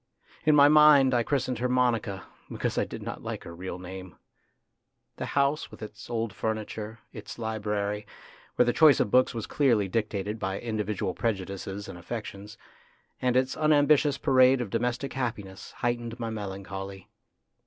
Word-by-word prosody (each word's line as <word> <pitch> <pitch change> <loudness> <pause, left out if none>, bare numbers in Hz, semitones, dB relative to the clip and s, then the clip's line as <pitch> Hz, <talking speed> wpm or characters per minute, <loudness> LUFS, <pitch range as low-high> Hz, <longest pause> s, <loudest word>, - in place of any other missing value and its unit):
In 155 - +6
my 145 -1 +8
mind 150 -3 +7
I 120 - +3
christened 130 -1 -1
her 125 +1 0
Monica, 115 -6 +1 0.3
because - - -2
I - - +1
did - - -8
not - - -6
like - - -5
her 85 - -9
real 90 0 -6
name. 95 -1 -9 1.0
The - - -4
house, 140 +2 +1
with - - -11
its 105 +1 -10
old 115 -3 -2
furniture, 110 0 -4 0.2
its - - -9
library, 105 -2 -2 0.5
where 125 - +4
the 120 - +2
choice 150 +1 +6
of 105 - +1
books 130 -1 +4
was 115 - -3
clearly 120 -9 +2
dictated 105 0 -2
by 95 -1 -2
individual 105 -4 -2
prejudices 100 -2 -3
and 85 - -9
affections, 105 +1 -7 0.6
and 125 0 +2
its 130 0 +1
unambitious 150 -2 +3
parade 130 0 +5
of 115 -6 -4
domestic 120 +3 -1
happiness, 105 -7 -4
heightened 120 0 -3
my 115 -1 -3
melancholy. 95 -2 -6
115 Hz, 155 wpm, -28 LUFS, 100-125 Hz, 1.0 s, my